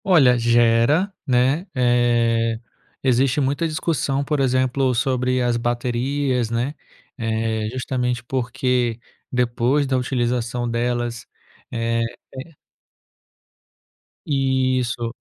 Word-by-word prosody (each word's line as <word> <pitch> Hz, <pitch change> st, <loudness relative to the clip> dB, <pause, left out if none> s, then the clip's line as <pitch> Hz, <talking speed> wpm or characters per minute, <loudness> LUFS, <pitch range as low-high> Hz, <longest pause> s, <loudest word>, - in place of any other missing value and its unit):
Olha, 150 Hz, -10 st, +5 dB
gera, 120 Hz, -, +3 dB
né, 135 Hz, +8 st, +2 dB
eh, 120 Hz, -2 st, +2 dB, 0.4 s
existe 130 Hz, +2 st, +2 dB
muita 140 Hz, +4 st, 0 dB
discussão, 155 Hz, -3 st, -1 dB
por 150 Hz, +1 st, -1 dB
exemplo, 130 Hz, 0 st, +1 dB
sobre 130 Hz, 0 st, +1 dB
as 120 Hz, -1 st, +1 dB
baterias, 125 Hz, +1 st, -1 dB
né, 120 Hz, +5 st, -1 dB, 0.5 s
eh, 110 Hz, -1 st, -1 dB
justamente 125 Hz, -1 st, -2 dB
porque 125 Hz, -1 st, -1 dB, 0.3 s
depois 125 Hz, +3 st, +1 dB
da 135 Hz, -1 st, 0 dB
utilização 120 Hz, -1 st, -1 dB
delas 120 Hz, 0 st, -2 dB, 0.4 s
eh, 115 Hz, 0 st, -1 dB, 0.4 s
eh 160 Hz, +5 st, -9 dB, 1.7 s
Isso. 130 Hz, -4 st, 0 dB
125 Hz, 90 wpm, -21 LUFS, 120-135 Hz, 1.7 s, Olha